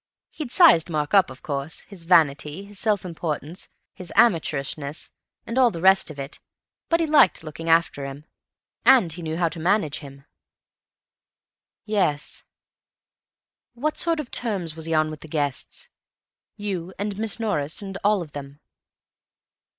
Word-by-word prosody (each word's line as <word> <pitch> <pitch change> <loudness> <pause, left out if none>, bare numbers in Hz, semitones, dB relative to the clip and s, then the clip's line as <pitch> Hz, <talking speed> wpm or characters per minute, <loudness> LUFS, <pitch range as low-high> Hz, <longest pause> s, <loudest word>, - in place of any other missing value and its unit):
He'd 300 -7 -6
sized 280 - +6
Mark 150 0 -2
up, 195 -6 +5
of 130 - -12
course—his 160 +4 -5
vanity, 160 +1 +2
his 205 -1 -8
self 210 -4 +1
importance, 165 -1 -5 0.2
his 180 -2 -8
amateurishness 155 -8 +1 0.3
and 240 +3 -1
all 250 -2 +6
the 170 - -6
rest 190 +1 +4
of 155 - -9
it—but 140 - -5
he 330 - +2
liked 295 - +4
looking 165 +1 -6
after 165 -3 +2
him. 140 +2 -8 0.6
And 245 -11 +6
he 175 +3 -8
knew 160 -1 -3
how 170 -1 +2
to 165 - -7
manage 170 -3 +1
him." 140 -1 -13 1.6
"Yes.... 190 -9 -1 1.3
What 300 +6 -1
sort 335 -2 +1
of 285 -5 -6
terms 190 -9 0
was 160 -1 -4
he 165 - -2
on 155 0 +2
with 155 - -8
the - - -11
guests—you 165 +5 -6
and 205 0 -3
Miss 225 0 -1
Norris 180 -6 -2
and 195 -1 -7
all 205 -2 +3
of 155 - -13
them?" 140 0 -9
170 Hz, 145 wpm, -24 LUFS, 150-205 Hz, 1.6 s, sized